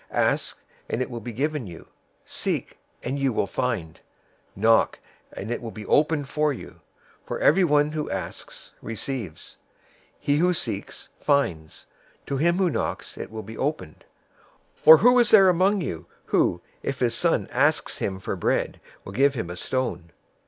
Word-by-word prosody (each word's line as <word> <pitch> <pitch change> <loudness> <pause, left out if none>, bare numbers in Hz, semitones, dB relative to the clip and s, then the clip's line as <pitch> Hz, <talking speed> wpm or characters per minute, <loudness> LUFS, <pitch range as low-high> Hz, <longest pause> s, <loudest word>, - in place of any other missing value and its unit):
007:007 - - -5
"Ask, - - +1 0.3
and 120 - -1
it 130 - -8
will 120 - -5
be 120 +2 -7
given 145 +1 -2
you. 85 -2 -11 0.4
Seek, - - -3 0.2
and 135 +3 -2
you 135 -1 +1
will 110 - 0
find. 105 -10 -3 0.6
Knock, 110 +3 +3 0.3
and 105 +4 -6
it 120 - -2
will 115 - -5
be 110 -1 -9
opened 150 +1 +2
for 150 +1 +1
you. 135 - -9 0.5
007:008 - - -34
For - - -3
everyone 150 -3 +4
who 155 -1 -3
asks - - -7
receives. 115 - -6 0.6
He 145 -1 +1
who 180 +3 +3
seeks 105 -9 -5
finds. 85 - 0 0.4
To 140 - -2
him 170 +5 +2
who 185 -3 +2
knocks - - -3
it - - -7
will 110 0 -7
be 110 +2 -9
opened. 140 - -3 0.8
007:009 - - -21
Or 160 0 +12
who 245 +7 +5
is 240 - +4
there 195 -4 +7
among 190 +3 +3
you, 85 - -5 0.2
who, 85 - +1 0.2
if 135 -1 -3
his 120 -2 +1
son - - +1
asks - - +1
him 95 -1 -2
for - - -4
bread, - - -1 0.2
will 95 - -8
give 135 +4 +3
him 90 -8 -4
a - - -6
stone? 90 -5 -3
130 Hz, 175 wpm, -25 LUFS, 110-155 Hz, 0.8 s, Or